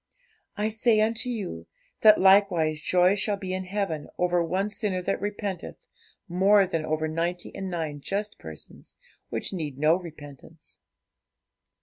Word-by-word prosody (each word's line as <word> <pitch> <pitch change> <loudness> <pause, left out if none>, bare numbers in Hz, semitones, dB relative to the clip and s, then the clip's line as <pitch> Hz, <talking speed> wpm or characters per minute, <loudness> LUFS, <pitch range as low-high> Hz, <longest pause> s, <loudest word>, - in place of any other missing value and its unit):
I 210 +1 0
say 220 0 +2
unto 225 +3 +1
you, 185 - -5 0.3
that 215 -1 +7
likewise 185 -6 +4
joy 180 +3 +4
shall 205 0 0
be 190 -2 -5
in 185 0 -3
heaven 185 -6 -3
over 175 -1 +2
one 185 +4 0
sinner 205 -3 -1
that - - -1
repenteth, 200 -3 -4 0.5
more 195 +3 +4
than 165 -4 -2
over 155 0 -1
ninety 170 +3 -2
and 190 -1 -5
nine 160 -5 -4
just 205 +6 -3
persons, 80 -1 -10 0.3
which - - -3
need 150 -7 -4
no 155 +3 +4
repentance.' 150 -6 -9
185 Hz, 140 wpm, -26 LUFS, 160-205 Hz, 0.5 s, that